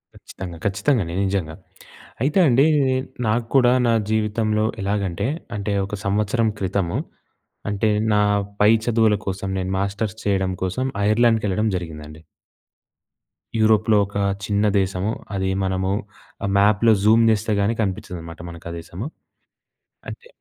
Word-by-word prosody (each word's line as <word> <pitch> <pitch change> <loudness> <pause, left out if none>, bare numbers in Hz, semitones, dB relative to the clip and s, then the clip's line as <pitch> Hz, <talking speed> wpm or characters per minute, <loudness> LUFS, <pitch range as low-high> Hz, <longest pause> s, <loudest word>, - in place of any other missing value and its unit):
ఖచ్చితంగా. 90 -3 -9
ఖచ్చితంగండి. 100 - 0
నిజంగా. 90 -5 -2 0.7
అయితే 150 +8 +2
అండి 135 +3 +4 0.6
నాకు 115 +2 +1
కూడా 125 -2 +6 0.2
నా 115 - +3 0.2
జీవితంలో 110 0 +1 0.2
ఎలాగంటే 100 0 -1 0.3
అంటే 100 0 -2
ఒక 105 - -5
సంవత్సరం 105 +3 +1
క్రితము. 95 -2 -1 0.7
అంటే 105 +2 +1 0.2
నా 105 - +4 0.4
పై 105 +1 +6
చదువుల 110 -3 +3
కోసం 95 0 -3
నేను 95 +1 -3
మాస్టర్స్ 100 +2 -2
చేయడం 95 -2 +1
కోసం 95 +8 -1 0.2
ఐర్లాండ్‌కెళ్ళడం 110 -2 +2
జరిగిందండి. 75 -2 -8 1.4
యూరోప్‌లో 110 -1 +4
ఒక 100 - -15 0.3
చిన్న 105 0 +1
దేశము. 95 +2 -1 0.2
అది 95 0 -1
మనము 95 0 -1 0.7
మ్యాప్‍లో 105 +3 +4
జూమ్ 110 +2 +5
చేస్తే 110 0 0
కాని 110 +3 +1
కనిపించదనమాట 85 -4 -5
మనకు 85 0 -10
ఆ - - -6
దేశము. 90 - -7 1.0
అంటే 475 - -9
105 Hz, 120 wpm, -22 LUFS, 95-110 Hz, 1.4 s, కూడా